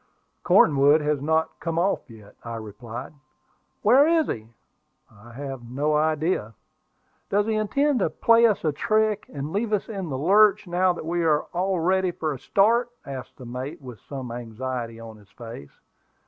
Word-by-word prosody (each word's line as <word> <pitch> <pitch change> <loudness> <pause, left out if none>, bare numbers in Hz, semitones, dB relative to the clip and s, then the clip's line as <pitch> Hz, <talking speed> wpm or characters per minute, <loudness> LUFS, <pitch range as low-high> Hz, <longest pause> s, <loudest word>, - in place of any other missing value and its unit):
"Cornwood 145 +1 +5
has 150 -2 0
not 160 +2 0
come 165 -1 -3
off 180 -3 0
yet," 105 -3 -15
I 115 0 -6
replied. 110 +3 -8 0.7
"Where 260 +8 +6
is 325 -1 +3
he?" 110 -1 -5 0.6
"I 110 +3 -16
have 135 -2 -7
no 145 +4 0
idea." 155 - 0 0.7
"Does 205 +1 +2
he 220 - 0
intend 270 +6 +1
to 185 - +1
play 230 +8 +4
us 210 -6 -1
a 155 - +3
trick, 215 +4 0
and 145 +2 -5
leave 215 +2 -1
us 210 - 0
in 195 -6 -5
the 135 - -3
lurch, 205 +7 +4
now 180 +1 +2
that 170 - -8
we 170 +1 -1
are 155 -2 +2
all 185 +1 0
ready 185 +2 +2
for 160 -3 -3
a 135 - -8
start?" 230 - +2 0.2
asked 135 -3 -8
the 130 - -10
mate, 125 +4 -6
with 125 -6 -11
some 130 -1 -7
anxiety 120 0 -5
on 115 -1 -10
his 105 -2 -20
face. 115 -12 -11
155 Hz, 175 wpm, -24 LUFS, 125-195 Hz, 0.7 s, Where